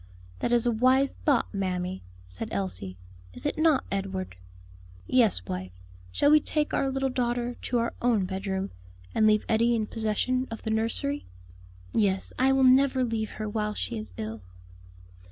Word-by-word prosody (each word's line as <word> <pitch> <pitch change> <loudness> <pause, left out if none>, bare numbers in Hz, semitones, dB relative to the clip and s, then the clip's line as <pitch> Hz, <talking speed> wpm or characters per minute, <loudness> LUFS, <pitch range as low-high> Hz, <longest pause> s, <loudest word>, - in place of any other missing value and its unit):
"That - - -1
is 240 -1 +4
a 240 - +3
wise 255 +4 +3
thought, 280 -8 +2
mammy," 185 -1 -2 0.3
said 90 0 -6
Elsie. 95 -1 -3 0.4
"Is - - -5
it 295 - -1
not, 315 -4 +4
Edward?" 190 - -3 0.7
"Yes, 220 - +3
wife; 90 0 -4 0.4
shall 285 - +3
we 305 - +8
take 300 0 -1
our 270 - +1
little 270 0 0
daughter 245 -1 -1
to 245 - -2
our 235 0 0
own 230 -6 +2
bedroom, 190 +1 -3 0.4
and 215 - +4
leave 215 0 +3
Eddie 235 +2 +3
in 220 -2 0
possession 225 +4 -1
of 225 - -7
the 220 - -2
nursery?" 230 +6 -1 0.7
"Yes, 195 -2 +1
I 265 +1 +4
will 270 0 +3
never 260 0 +5
leave 225 -2 -2
her 215 - -4
while 210 0 -2
she 115 - -3
is 105 -3 -6
ill." 110 0 -5
225 Hz, 165 wpm, -27 LUFS, 190-255 Hz, 0.7 s, we